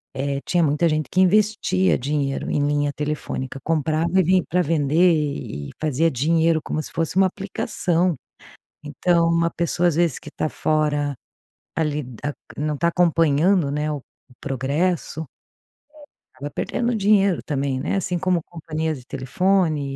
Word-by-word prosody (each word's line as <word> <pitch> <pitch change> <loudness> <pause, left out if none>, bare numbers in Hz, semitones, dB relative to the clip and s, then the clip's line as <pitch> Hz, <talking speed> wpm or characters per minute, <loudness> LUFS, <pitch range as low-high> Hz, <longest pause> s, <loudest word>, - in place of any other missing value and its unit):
eh, 140 +1 -2
tinha 175 -2 +2
muita 150 +3 +2
gente 155 -1 -1
que 185 - +3
investia 190 -1 +3
dinheiro 140 0 -2
em 145 - +1
linha 145 0 +1
telefônica, 145 -3 -4
comprava 165 +3 +1
e - - +5
vim 185 +1 +3
para 180 +2 +2
vender 165 +2 +3
e 140 - -3
fazia 155 +2 +1
dinheiro 160 +4 +2
como 155 - -2
se - - -8
fosse 165 0 -2
uma 190 0 +6
aplicação. 180 -2 -1 0.7
Então, 165 +3 +2
uma 170 0 +2
pessoa, 170 +1 +1
às 160 - 0
vezes, 170 -5 +1
que - - -12
está 155 - -2
fora 150 -2 0 0.6
ali 150 -2 -1
da 130 +4 -6 0.2
não 150 +1 -1
está 170 +4 +1
acompanhando, 165 -1 +3
né, 150 +1 -1
o 145 -3 -4 0.4
progresso, 145 +5 -1
eh, - - -5 1.1
acaba 145 +2 -6
perdendo 240 0 -1
dinheiro, 200 -3 +3
também, 140 -2 -1
né, - - -2
assim, 180 -2 -1
como 180 -1 +1
companhias 160 -2 -4
de 125 - -16
telefone 160 +4 +1
160 Hz, 150 wpm, -22 LUFS, 145-175 Hz, 1.1 s, uma